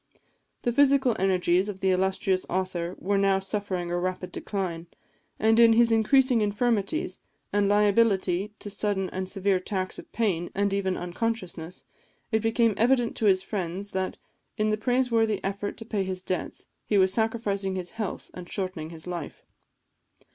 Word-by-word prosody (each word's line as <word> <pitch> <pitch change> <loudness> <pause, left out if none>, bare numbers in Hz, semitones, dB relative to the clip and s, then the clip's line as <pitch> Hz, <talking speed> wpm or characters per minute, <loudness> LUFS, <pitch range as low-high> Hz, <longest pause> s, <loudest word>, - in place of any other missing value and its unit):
The 240 - +1
physical 270 -3 +4
energies 185 0 +2
of 195 -2 -6
the 190 0 +2
illustrious 190 0 +1
author 185 -1 -2
were 200 +1 0
now 195 -1 +3
suffering 190 -3 -3
a 175 - 0
rapid 180 0 -3
decline; 175 -4 -4 0.5
and 220 +1 +3
in 230 -1 +7
his 235 0 +4
increasing 245 +2 +4
infirmities, 225 - 0 0.3
and 205 -1 +2
liability 205 -2 +3
to 205 - -7
sudden 200 -2 -1
and 185 0 -4
severe 195 0 +1
attacks 185 0 -3
of - - -13
pain, 190 -7 0
and 200 0 +1
even 190 -2 0
of - - -5
unconsciousness, 180 -3 -4 0.5
it 220 - +3
became 225 0 +2
evident 245 0 +2
to 220 - 0
his 190 -1 +4
friends, 195 0 -4
that, 190 0 -2 0.4
in 215 0 +1
the - - +2
praiseworthy 230 -2 +1
effort 200 +1 -3
to 225 - -8
pay 210 -3 -1
his 185 -1 -4
debts, 185 -1 -4 0.2
he 210 - +1
was 190 -1 +4
sacrificing 205 -3 -1
his 180 -1 -4
health 215 -4 -5
and 180 -1 -9
shortening 185 -5 -4
his 165 -1 -11
life. 175 -4 -6
200 Hz, 160 wpm, -27 LUFS, 185-220 Hz, 0.5 s, in